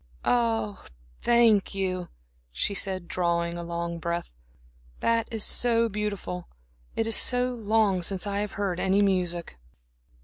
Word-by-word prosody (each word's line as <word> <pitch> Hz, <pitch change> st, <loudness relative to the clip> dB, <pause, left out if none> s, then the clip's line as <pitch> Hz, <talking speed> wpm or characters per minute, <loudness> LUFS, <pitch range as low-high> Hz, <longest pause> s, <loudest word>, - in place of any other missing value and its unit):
"Ah, 225 Hz, -4 st, +1 dB, 0.4 s
thank 230 Hz, -5 st, +4 dB
you," 185 Hz, -2 st, -2 dB, 0.4 s
she 65 Hz, -, -1 dB
said, 190 Hz, -3 st, 0 dB
drawing 170 Hz, -1 st, 0 dB
a 175 Hz, -, -5 dB
long 170 Hz, 0 st, -4 dB
breath. 170 Hz, +1 st, -3 dB, 0.7 s
"That 230 Hz, 0 st, +1 dB
is 225 Hz, -2 st, 0 dB
so 230 Hz, -1 st, +3 dB
beautiful. 200 Hz, -4 st, -4 dB, 0.5 s
It 225 Hz, -, 0 dB
is 225 Hz, -1 st, +1 dB
so 250 Hz, 0 st, +3 dB
long 215 Hz, -4 st, +1 dB
since 190 Hz, +2 st, 0 dB
I 200 Hz, 0 st, -2 dB
have 210 Hz, -1 st, -3 dB
heard 195 Hz, -3 st, -2 dB
any 195 Hz, +2 st, +3 dB
music." 175 Hz, -, 0 dB
195 Hz, 135 wpm, -27 LUFS, 175-225 Hz, 0.7 s, thank